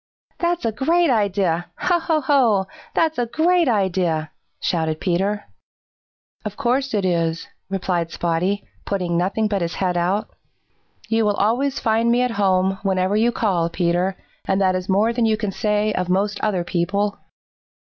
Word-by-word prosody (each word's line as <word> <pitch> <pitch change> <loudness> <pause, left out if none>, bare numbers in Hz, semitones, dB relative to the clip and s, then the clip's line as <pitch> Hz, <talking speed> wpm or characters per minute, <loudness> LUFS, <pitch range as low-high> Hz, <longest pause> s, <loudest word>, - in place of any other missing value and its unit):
"That's 345 -2 0
a 225 - +1
great 330 +6 +2
idea! 195 -6 +1
Ho, 350 -1 +1
ho, 320 -2 0
ho! 250 -9 +3 0.3
That's 320 -4 +1
a 240 - 0
great 335 +6 +2
idea!" 185 -8 0 0.3
shouted 160 -2 -1
Peter. 200 +3 -1 1.0
"Of 210 -2 -6
course 265 -1 0
it 200 -2 0
is," 165 -2 0 0.2
replied 180 -3 -1
Spotty, 175 +5 -1 0.2
putting 180 -4 -2
nothing 195 +5 +1
but 200 -2 -1
his 170 0 -2
head 180 -2 0
out, 185 +5 0 0.8
"You 225 0 +2
will 205 -1 +2
always 250 +7 +1
find 225 +1 +2
me 245 +1 +3
at 250 - 0
home 190 0 +2
whenever 190 0 +1
you 230 +3 +3
call, 185 -8 0
Peter, 175 +2 0 0.3
and 190 - +1
that 190 -1 +3
is 185 +1 -3
more 210 +5 +3
than 235 -1 +1
you 215 -1 +2
can 210 -2 -2
say 210 +1 0
of 180 -1 -2
most 200 +3 0
other 195 -5 0
people." 195 +4 -1
200 Hz, 160 wpm, -21 LUFS, 180-230 Hz, 1.0 s, ho